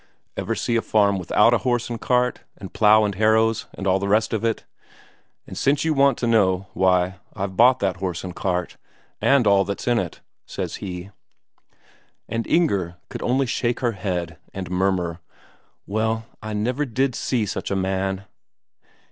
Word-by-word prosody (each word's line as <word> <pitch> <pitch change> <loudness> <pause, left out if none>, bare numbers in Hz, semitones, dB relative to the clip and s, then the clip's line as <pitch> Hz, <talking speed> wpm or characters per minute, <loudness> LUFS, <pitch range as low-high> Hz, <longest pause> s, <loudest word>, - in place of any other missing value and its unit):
"Ever 100 +4 -2
see 120 - -1
a - - +1
farm 100 -3 +2
without 105 +6 +3
a 120 - +3
horse 120 +2 0
and 120 -1 -5
cart, 125 0 +1 0.2
and 95 - -10
plough 110 0 +5
and 100 - -1
harrows, 110 +2 +2
and 95 - -6
all 95 0 +3
the 100 - -2
rest 110 +3 +2
of 110 - -1
it? 115 -1 -1 0.8
And - - -9
since 140 +2 +1
you 160 - +2
want 140 -3 +3
to - - -2
know, 100 -5 +2
why, 90 0 +2 0.2
I've 95 -1 -4
bought 125 +5 +6
that 95 -3 0
horse 90 -2 -3
and 90 -1 -6
cart, 90 -2 -2 0.4
and 135 -3 +4
all 100 -1 +5
that's 100 +4 -5
in 120 -1 +3
it," 90 - -5 0.3
says - - -4
he. 90 0 -7 1.2
And 115 0 -3
Inger 100 - +1
could - - -6
only 130 +2 +1
shake 120 0 -1
her 120 -2 +1
head 90 -5 -4 0.2
and 95 -3 -5
murmur: 90 -2 0 0.7
"Well, 110 +2 -1 0.2
I 110 0 -5
never 120 +7 -1
did 130 0 0
see 120 -2 -1
such 100 - -4
a 100 - -1
man!" 95 0 -1
105 Hz, 175 wpm, -23 LUFS, 95-120 Hz, 1.2 s, bought